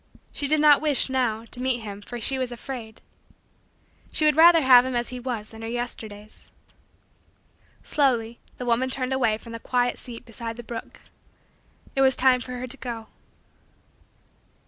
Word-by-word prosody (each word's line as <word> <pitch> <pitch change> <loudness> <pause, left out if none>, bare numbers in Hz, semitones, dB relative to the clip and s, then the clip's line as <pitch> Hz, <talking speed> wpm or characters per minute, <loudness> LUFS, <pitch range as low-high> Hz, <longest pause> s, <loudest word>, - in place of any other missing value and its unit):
She 285 - -2
did 305 +1 +2
not 295 -1 +6
wish, 295 -3 +2
now, 230 -4 0
to 250 - -3
meet 255 -2 0
him 205 -2 -8
for 240 +4 -7
she 265 +4 0
was 255 -1 -2
afraid. 240 -2 -8 1.1
She 310 - +2
would 300 -1 +5
rather 330 +1 +7
have 255 -3 +7
him 260 -1 -3
as 240 0 -1
he 250 - -6
was 235 -4 -5
in 220 - -10
her 225 - -5
Yesterdays. 220 -3 -7 1.3
Slowly 240 -5 0 0.2
the 250 - -5
woman 245 +2 +1
turned 260 0 -2
away 230 -5 +1
from 230 +1 -12
the 230 - -6
quiet 245 +1 0
seat 235 -2 -10
beside 230 0 -7
the 240 - -8
brook. 230 0 -8 0.9
It 270 - +2
was 265 -1 +4
time 255 -1 +3
for 250 +1 -7
her 250 0 -5
to 255 +2 -1
go. 230 -4 -7
245 Hz, 170 wpm, -25 LUFS, 230-265 Hz, 1.3 s, rather